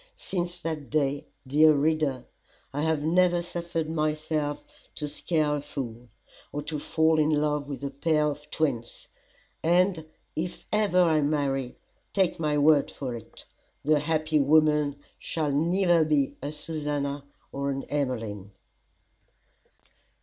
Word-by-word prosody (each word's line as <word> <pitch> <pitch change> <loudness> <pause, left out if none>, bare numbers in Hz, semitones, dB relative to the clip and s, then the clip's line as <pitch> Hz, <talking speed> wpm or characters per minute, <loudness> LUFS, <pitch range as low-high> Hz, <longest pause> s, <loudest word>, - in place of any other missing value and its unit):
Since 175 -1 -3
that 155 -4 -4
day, 145 -2 0 0.2
dear 155 +4 +6
reader, 150 -3 +1 0.5
I 145 - -1
have 160 -1 +1
never 175 +2 +3
suffered 170 -2 -3
myself 155 - -1 0.3
to 150 - -4
scare 150 0 0
a - - -4
fool, 125 -5 -6 0.4
or 145 - -4
to 150 0 -3
fall 160 +1 +2
in 155 0 +3
love 150 -1 +1
with 140 0 -6
a 140 - -2
pair 150 +2 +1
of 150 0 -4
twins; 125 -7 -2 0.5
and 175 0 +3 0.3
if 175 +3 -4
ever 210 -4 +3
I 160 -3 +3
marry, 140 -3 -1 0.4
take 190 -4 +1
my 150 -2 +1
word 145 0 +5
for 130 -3 -5
it, 115 -2 -10 0.4
the 150 0 +4
happy 155 0 +1
woman 150 0 +4 0.2
shall 155 -3 -2
neither 170 +3 +3
be 150 -3 +1
a 145 +2 -3
Susannah, 145 -2 -3 0.3
nor 140 0 -2
an 135 0 -2
Emmeline. 115 -8 -3
150 Hz, 135 wpm, -27 LUFS, 140-160 Hz, 0.5 s, dear